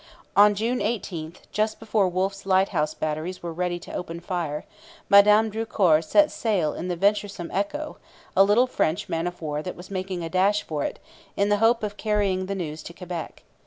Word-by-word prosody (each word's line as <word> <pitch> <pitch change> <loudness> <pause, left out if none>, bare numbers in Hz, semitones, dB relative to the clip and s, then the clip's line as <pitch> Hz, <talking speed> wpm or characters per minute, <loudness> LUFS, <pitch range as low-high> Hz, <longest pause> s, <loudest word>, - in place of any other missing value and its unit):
On 205 0 +7
June 230 +5 -1
18, 180 -7 -3 0.2
just 215 0 -1
before 215 -4 +1
Wolfe's 195 +2 -2
lighthouse 185 -5 +2
batteries 155 +4 -3
were 170 -1 -4
ready 175 +1 -1
to 175 - -11
open 170 -1 -5
fire, 170 -4 -3 0.4
Madame 210 +2 +6
Drucour 200 -7 +2
set 300 - +3
sail 190 -10 0
in 180 - -5
the 180 - -1
venturesome 200 -1 0
Echo, 295 +11 -2 0.4
a 195 - +7
little 210 +5 +4
French 195 -6 -1
man 165 +1 -1
of 175 0 -6
war 150 -1 -2
that 180 - -6
was 180 +3 -12
making 185 -2 -3
a - - -3
dash 195 +4 +2
for 150 -3 -3
it, - - -3 0.4
in 200 +1 +2
the 205 - +3
hope 225 +2 +3
of 205 -1 -3
carrying 200 -3 0
the 195 - -2
news 160 -4 -5
to 170 - -9
Quebec. 175 -2 -7
190 Hz, 190 wpm, -25 LUFS, 170-210 Hz, 0.4 s, On